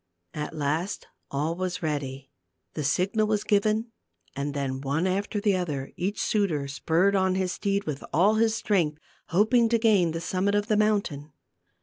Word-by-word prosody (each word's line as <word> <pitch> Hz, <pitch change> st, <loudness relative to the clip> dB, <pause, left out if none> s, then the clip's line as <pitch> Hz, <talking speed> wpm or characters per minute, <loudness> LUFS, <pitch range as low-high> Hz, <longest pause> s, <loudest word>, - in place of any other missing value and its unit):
At 150 Hz, 0 st, -5 dB
last 155 Hz, +6 st, -2 dB, 0.2 s
all 150 Hz, +4 st, -1 dB
was 180 Hz, -1 st, -3 dB
ready; 140 Hz, -3 st, -3 dB, 0.4 s
the 150 Hz, -, -3 dB
signal 195 Hz, +9 st, +1 dB
was 210 Hz, -1 st, 0 dB
given 215 Hz, +3 st, +1 dB, 0.4 s
and 140 Hz, +1 st, -3 dB
then, 135 Hz, -2 st, -2 dB
one 140 Hz, +5 st, 0 dB
after 200 Hz, +3 st, -1 dB
the 205 Hz, -2 st, +2 dB
other, 150 Hz, -7 st, -3 dB
each 195 Hz, +4 st, -2 dB
suitor 170 Hz, -10 st, 0 dB
spurred 165 Hz, +7 st, +1 dB
on 190 Hz, -1 st, +2 dB
his 185 Hz, -1 st, 0 dB
steed 200 Hz, +1 st, -1 dB
with 150 Hz, -2 st, -5 dB
all 190 Hz, +7 st, +4 dB
his 220 Hz, 0 st, +2 dB
strength, 180 Hz, -9 st, +1 dB, 0.3 s
hoping 225 Hz, +5 st, +3 dB
to 235 Hz, -, +3 dB
gain 210 Hz, -6 st, +3 dB
the 165 Hz, +1 st, -3 dB
summit 190 Hz, +4 st, 0 dB
of 205 Hz, 0 st, +1 dB
the 215 Hz, -, +1 dB
mountain. 200 Hz, -9 st, 0 dB
185 Hz, 165 wpm, -26 LUFS, 150-205 Hz, 0.4 s, all